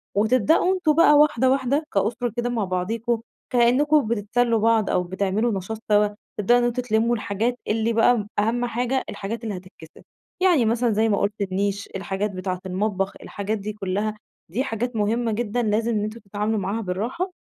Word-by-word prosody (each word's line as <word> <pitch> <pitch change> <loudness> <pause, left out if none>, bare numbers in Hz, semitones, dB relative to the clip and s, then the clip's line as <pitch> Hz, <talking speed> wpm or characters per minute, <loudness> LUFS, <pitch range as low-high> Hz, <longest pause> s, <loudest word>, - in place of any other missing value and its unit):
وتبدؤوا 255 - +3
أنتم 350 -5 +2
بقى 330 -2 +6
وحدة، 260 -4 +4
وحدة 270 +3 +1
كاُسرة 225 +3 0
كده 240 0 0
مع 230 -4 -1
بعضيكم 220 +6 -1 0.3
كإنكم 255 +3 +3
بتتسلّوا 230 +1 +1
بعض 225 -1 +2
أو 180 - +1
بتعملوا 195 +5 -1
نشاط 215 +4 -6
سوا، 210 0 +5 0.3
تبدؤوا 240 +4 +4
إن - - 0
أنتم 240 +1 0
تلمّوا 230 0 +1
الحاجات 225 +3 -2
اللي 225 +1 +1
بقى 225 -2 +3
أهَم 235 +3 +1
حاجة 245 +2 -1
الحاجات 225 +4 -5
اللي 210 -4 -3
هتتكسِر، 180 -3 -14 0.4
يعني 340 -10 +4
مثلًا 235 +1 +1
زي 220 +2 +2
ما 200 - +2
قُلت، 205 +1 -1
النيش، 200 +1 -1
الحاجات 195 +1 -2
بتاعة 185 -1 -4
المطبخ، 195 +1 -1
الحاجات 205 +2 -3
دي 210 +1 -5
كلّها 210 +1 -2 0.3
دي 245 +9 0
حاجات 245 -1 -3
مهمة 225 +2 0
جدًا 235 +2 -1
لازم 220 +2 +1
إن 210 -2 0
أنتم 215 +2 -5
تتعاملوا 210 +1 -2
معاها 200 +4 -2
بالرّاحة 230 - -3
220 Hz, 170 wpm, -23 LUFS, 205-240 Hz, 0.4 s, بقى